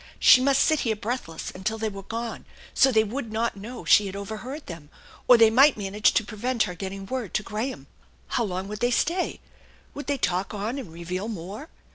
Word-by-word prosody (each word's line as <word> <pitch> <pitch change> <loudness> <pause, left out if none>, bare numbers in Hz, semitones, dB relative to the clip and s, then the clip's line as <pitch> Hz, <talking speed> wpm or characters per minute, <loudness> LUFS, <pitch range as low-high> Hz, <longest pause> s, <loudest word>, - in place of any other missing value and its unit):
She 255 - +7
must 275 +1 +4
sit 315 -2 +2
here 225 -4 0
breathless 210 -7 -4
until 190 +4 -3
they 220 0 -2
were 200 -2 -6
gone, 230 +3 -5 0.3
so 270 - +5
they 220 -2 +4
would 230 +1 -5
not 225 +1 -1
know 225 +5 -8
she 205 - +5
had 195 - -6
overheard 220 +9 -6
them, 165 -4 -9 0.4
or 245 - +8
they 225 -1 +6
might 270 +4 +6
manage 205 +1 +2
to 230 - +2
prevent 235 +3 -1
her 180 - -4
getting 195 +2 -6
word 250 -1 -4
to 215 - +1
Graham. 220 +6 -4 0.4
How 240 - 0
long 190 -2 -3
would 210 +1 -6
they 240 - +2
stay? 340 +9 0 0.5
Would 290 - -7
they 285 -1 0
talk 185 -2 -1
on 220 +7 -3
and 215 -12 -8
reveal 180 +4 -5
more? 210 - -7
220 Hz, 205 wpm, -25 LUFS, 195-250 Hz, 0.5 s, or